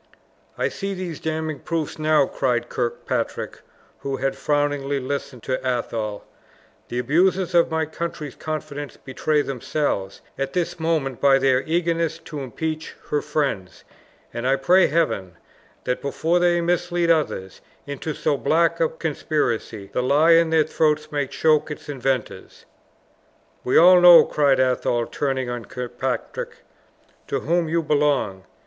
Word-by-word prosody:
"I -, -, +1 dB
see 195 Hz, -1 st, -4 dB
these 180 Hz, -4 st, -5 dB
damning 160 Hz, -2 st, -3 dB
proofs 160 Hz, -1 st, -3 dB
now!" 155 Hz, -2 st, +3 dB
cried 120 Hz, -3 st, -1 dB
Kirkpatrick, 120 Hz, -2 st, -3 dB, 0.4 s
who 135 Hz, -1 st, -3 dB
had 135 Hz, 0 st, -1 dB
frowningly 145 Hz, -1 st, 0 dB
listened 135 Hz, -2 st, -5 dB
to 130 Hz, -, -2 dB
Athol; 115 Hz, -4 st, -3 dB, 0.6 s
"the 120 Hz, -, -5 dB
abusers 180 Hz, +8 st, +2 dB
of 170 Hz, -1 st, +4 dB
my 160 Hz, -1 st, 0 dB
country's 155 Hz, -2 st, -5 dB
confidence 145 Hz, -2 st, -6 dB
betray 145 Hz, +3 st, -1 dB
themselves 130 Hz, -7 st, -2 dB, 0.2 s
at 135 Hz, 0 st, -2 dB
this 175 Hz, -1 st, -2 dB
moment 155 Hz, -6 st, -1 dB
by 140 Hz, -1 st, +6 dB
their 130 Hz, -1 st, +3 dB
eagerness 165 Hz, -1 st, 0 dB
to 150 Hz, -2 st, -8 dB
impeach 155 Hz, +4 st, -4 dB, 0.2 s
her 150 Hz, -, +1 dB
friends; 140 Hz, -, -3 dB, 0.5 s
and 120 Hz, +2 st, -3 dB
I 135 Hz, -, +4 dB
pray 175 Hz, +8 st, +4 dB
Heaven, 140 Hz, -, 0 dB, 0.5 s
that 125 Hz, -, -2 dB
before 160 Hz, +5 st, 0 dB
they 175 Hz, -1 st, +3 dB
mislead 175 Hz, 0 st, +1 dB
others 140 Hz, -, -1 dB, 0.2 s
into 145 Hz, +2 st, -5 dB
so 145 Hz, -, 0 dB
black 165 Hz, +4 st, +2 dB
a 165 Hz, -, +2 dB
conspiracy, 140 Hz, -, -2 dB
the -, -, +1 dB
lie 145 Hz, +6 st, +4 dB
in 165 Hz, 0 st, +5 dB
their 160 Hz, -1 st, +4 dB
throats 155 Hz, 0 st, 0 dB
may 145 Hz, -2 st, -1 dB
choke 155 Hz, +2 st, +2 dB
its 150 Hz, -, -8 dB
inventors!" 135 Hz, -3 st, -3 dB, 1.0 s
"We 125 Hz, -, +2 dB
all 180 Hz, +2 st, +8 dB
know," 175 Hz, -1 st, +9 dB
cried 140 Hz, -3 st, +2 dB
Athol, 125 Hz, -2 st, +1 dB
turning 135 Hz, -2 st, -2 dB
on 120 Hz, -2 st, -5 dB
Kirkpatrick, 125 Hz, +1 st, -5 dB, 0.6 s
"to -, -, -2 dB
whom 170 Hz, +1 st, 0 dB
you 165 Hz, +1 st, +1 dB
belong. 145 Hz, -11 st, 0 dB
145 Hz, 140 wpm, -23 LUFS, 130-165 Hz, 1.0 s, know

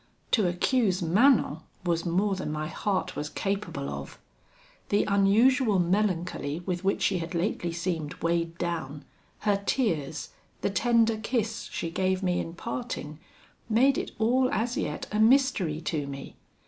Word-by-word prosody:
To 210 Hz, -6 st, +4 dB
accuse 185 Hz, +1 st, +1 dB
Manon 200 Hz, -, +4 dB, 0.3 s
was 170 Hz, 0 st, 0 dB
more 195 Hz, +4 st, +1 dB
than 185 Hz, -5 st, -3 dB
my 155 Hz, 0 st, -2 dB
heart 185 Hz, +4 st, -2 dB
was 150 Hz, 0 st, -3 dB
capable 195 Hz, -9 st, -3 dB
of. -, -, -6 dB, 0.7 s
The 205 Hz, -, +3 dB
unusual 210 Hz, +4 st, +4 dB
melancholy 175 Hz, -4 st, 0 dB
with 180 Hz, 0 st, -3 dB
which 195 Hz, +1 st, +1 dB
she 190 Hz, -3 st, +2 dB
had 170 Hz, +1 st, -5 dB
lately 175 Hz, -1 st, -1 dB
seemed 165 Hz, -3 st, -3 dB
weighed 170 Hz, 0 st, -1 dB
down, 160 Hz, -5 st, -4 dB, 0.4 s
her 205 Hz, -2 st, +1 dB
tears, 160 Hz, -, -1 dB, 0.3 s
the -, -, 0 dB
tender 230 Hz, +1 st, +3 dB
kiss 225 Hz, 0 st, -2 dB
she 165 Hz, -, -3 dB
gave 190 Hz, +2 st, 0 dB
me 180 Hz, -1 st, +1 dB
in 165 Hz, -, -5 dB
parting, 175 Hz, -8 st, -5 dB, 0.5 s
made 260 Hz, +5 st, +4 dB
it -, -, -2 dB
all 255 Hz, +4 st, +3 dB
as 240 Hz, -2 st, 0 dB
yet -, -, -3 dB
a 210 Hz, -, 0 dB
mystery 220 Hz, -, +3 dB
to 150 Hz, -3 st, -2 dB
me. 140 Hz, -1 st, -8 dB
190 Hz, 150 wpm, -28 LUFS, 165-220 Hz, 0.7 s, To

